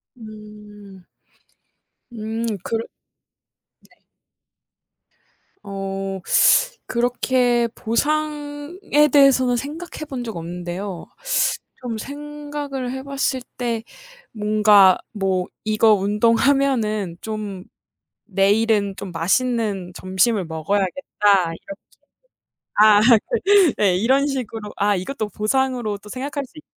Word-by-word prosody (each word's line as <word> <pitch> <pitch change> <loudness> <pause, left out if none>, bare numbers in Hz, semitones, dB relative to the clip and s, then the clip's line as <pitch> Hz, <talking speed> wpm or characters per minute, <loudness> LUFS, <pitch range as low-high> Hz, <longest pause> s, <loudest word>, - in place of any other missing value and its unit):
음. 210 -3 -13 1.1
음 225 +1 -4 0.2
그르 225 0 -2 1.1
네. - - -27 1.7
어 195 -1 -4 1.1
그렇게 245 -2 +2
보상에 295 - 0
대해서는 260 -3 +5
생각해 310 +5 -6
본 265 -3 -5
적 225 -4 -6
없는데요. 175 +2 -6 0.8
좀 240 -3 -4
생각을 290 -1 -6
해 265 0 -5
봤을 275 -1 -1 0.2
때 235 -2 -2 0.5
뭔가 210 -3 +5 0.2
뭐 190 -3 0 0.2
'이거 215 0 +4
운동하면은 215 -1 +1
좀 210 -4 -5 0.6
내일은 205 0 +2
좀 200 - -7
맛있는 200 +1 0
점심을 190 +3 +1
먹어야겠다.' 190 - 0
이렇게 295 - -11 1.0
아 210 -1 +7 0.6
그 360 -8 +5
네. 195 -4 +3
이런 260 +8 +2
식으로 230 -6 -4
아 205 0 +2
이것도 215 +4 -4
보상으로 240 0 -1
또 210 - -15
생각할 275 +4 -4
수 285 - -17
있 - - -12
220 Hz, 190 characters per minute, -21 LUFS, 200-265 Hz, 1.7 s, 아